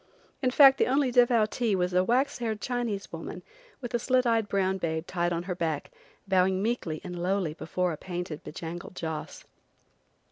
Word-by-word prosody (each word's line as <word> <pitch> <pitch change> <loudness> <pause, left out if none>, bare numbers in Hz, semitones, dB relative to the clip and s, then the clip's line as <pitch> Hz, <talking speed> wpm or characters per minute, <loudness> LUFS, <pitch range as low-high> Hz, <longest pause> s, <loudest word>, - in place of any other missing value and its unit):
In 255 - +2
fact, 270 +1 +7
the - - +3
only 265 0 +2
devoutee 235 -2 +3
was 180 -1 0
a 180 0 +4
waxed 250 +7 +1
haired 220 -3 -2
Chinese 235 -4 -3
woman, - - -7 0.4
with 245 -1 -6
a 240 - +2
slit 255 +1 +2
eyed 225 -3 +2
brown 190 -1 +1
babe 160 -1 -2
tied 175 -1 -1
on 170 0 -1
her 180 0 -3
back, 160 -4 -3 0.4
bowing 190 0 +3
meekly 195 -8 -2
and 180 -2 -6
lowly 185 -3 0
before 180 +3 -2
a 155 - -5
painted, 175 -3 -5
be - - -8
bangled 170 +3 -7
joss. 160 -3 -5
190 Hz, 180 wpm, -28 LUFS, 175-240 Hz, 0.4 s, fact